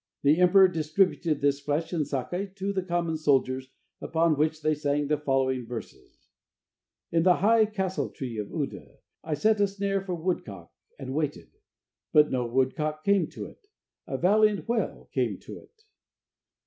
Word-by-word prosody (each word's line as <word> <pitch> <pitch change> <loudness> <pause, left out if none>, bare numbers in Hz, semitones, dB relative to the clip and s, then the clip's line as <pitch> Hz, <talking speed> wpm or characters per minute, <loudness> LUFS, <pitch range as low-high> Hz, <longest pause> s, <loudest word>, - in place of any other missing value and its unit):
The 150 +4 +4
emperor 190 +1 +7
distributed 165 -2 0
this 140 0 +2
flesh 155 +4 -2
and 155 -5 0
sake 180 +8 -4
to 200 0 -3
the 190 - 0
common 170 -3 -1
soldiers, 130 -3 +1 0.3
upon 165 -1 +1
which 155 +1 0
they 155 0 +2
sang 145 0 -1
the 150 +1 +1
following 130 -3 0
verses: 120 -1 -10 0.9
"In 165 - +3
the 180 +1 +5
high 220 +2 +4
{castle 190 -8 -2
tree} 120 -5 -6
of 105 - -4
Uda - - -5 0.3
I 155 -1 -2
set 215 +7 +2
a 200 - +4
snare 195 0 -2
for 185 -2 -4
woodcock, 125 - -4 0.3
And 130 0 -6
waited, 150 0 -3 0.6
But 150 -1 +5
no 125 -2 0
woodcock 140 +5 -1
came 200 -1 +3
to - - -8
it; 400 - -15 0.4
A - - -3
valiant 210 +3 +3
whale 230 -1 -2
came - - 0
to - - -9
it." 440 -2 -23
160 Hz, 160 wpm, -27 LUFS, 140-190 Hz, 0.9 s, emperor